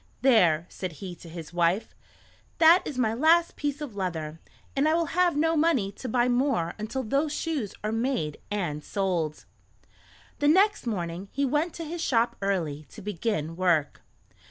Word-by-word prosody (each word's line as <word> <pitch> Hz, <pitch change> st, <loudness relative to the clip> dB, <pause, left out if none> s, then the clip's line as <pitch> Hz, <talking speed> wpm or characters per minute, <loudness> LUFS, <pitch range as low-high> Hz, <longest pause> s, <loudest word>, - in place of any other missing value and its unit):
"There," 175 Hz, -11 st, +4 dB
said 185 Hz, -3 st, -6 dB
he 180 Hz, +3 st, -7 dB
to 170 Hz, -, -12 dB
his 165 Hz, 0 st, -9 dB
wife; 175 Hz, +4 st, +1 dB, 0.6 s
"that 335 Hz, +2 st, +7 dB
is 275 Hz, -, -5 dB
my 225 Hz, -3 st, +1 dB
last 325 Hz, +7 st, +3 dB
piece 290 Hz, 0 st, -3 dB
of 270 Hz, -8 st, -6 dB
leather, 165 Hz, -5 st, -3 dB, 0.4 s
and 280 Hz, +3 st, +3 dB
I 315 Hz, -, +3 dB
will 335 Hz, 0 st, +1 dB
have 355 Hz, -3 st, +3 dB
no 325 Hz, +2 st, +2 dB
money 300 Hz, -11 st, +2 dB
to 245 Hz, +5 st, -7 dB
buy 240 Hz, +1 st, +2 dB
more 245 Hz, -, +1 dB
until 230 Hz, +5 st, -3 dB
those 275 Hz, +6 st, 0 dB
shoes 295 Hz, -, -3 dB
are 215 Hz, -, -1 dB
made 225 Hz, -, -1 dB
and 170 Hz, -8 st, -2 dB
sold." 175 Hz, -6 st, -2 dB, 0.9 s
The 290 Hz, -, +2 dB
next 385 Hz, -, +4 dB
morning 180 Hz, -3 st, -3 dB
he 280 Hz, +1 st, 0 dB
went 300 Hz, +5 st, 0 dB
to 335 Hz, -, -5 dB
his 335 Hz, +2 st, -5 dB
shop 235 Hz, -5 st, +2 dB
early 160 Hz, -7 st, -2 dB
to 215 Hz, -, -11 dB
begin 175 Hz, -5 st, -2 dB
work. 170 Hz, -5 st, +1 dB
225 Hz, 170 wpm, -27 LUFS, -, 0.9 s, that